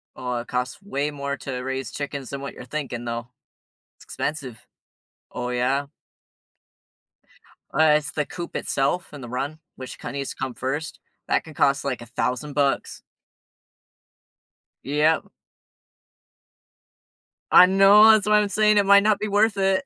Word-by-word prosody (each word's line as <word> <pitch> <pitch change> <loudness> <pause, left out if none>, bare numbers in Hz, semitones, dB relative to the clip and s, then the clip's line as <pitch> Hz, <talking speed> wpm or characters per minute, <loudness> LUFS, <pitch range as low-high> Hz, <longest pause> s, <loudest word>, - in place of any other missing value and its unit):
Oh, 125 -1 -3
it 120 - -6
costs 125 +1 -3
way 150 -7 -2
more 140 -1 -4
to 130 -1 -5
raise 135 0 -4
chickens 140 -2 -5
than 140 0 -6
what 140 - -6
you're - - -11
thinking 125 -3 -5
though. 115 0 -4 0.7
It's - - -18
expensive. 135 -7 -5 0.7
Oh, 125 0 -4
yeah. 130 +3 0 1.9
Uh, 155 +1 +4
it's 150 - -5
the 150 - -2
coop 175 +2 -8
itself 140 +6 -1
and 145 -3 -9
the 120 - -8
run, 140 +5 -4 0.2
which 130 -1 -9
kinda 140 - -6
needs 140 -1 -4
to - - -10
come 130 -1 -3
1st. 135 +6 -4 0.3
That - - +1
can 160 - -12
cost 140 -1 +1
like 130 -4 -3
1000 125 +4 -3
bucks. 140 -1 -1 1.8
Yep. 150 +3 +2 2.3
I 180 - +9
know. 195 +3 +7
That's 215 -2 +3
why 210 0 +5
I'm 205 -1 0
saying 210 +2 +3
it 200 - +4
might 200 0 +6
not 215 -1 +2
be 215 - -2
worth 210 +1 +2
it. 195 +3 +1
140 Hz, 150 wpm, -23 LUFS, 130-185 Hz, 2.3 s, I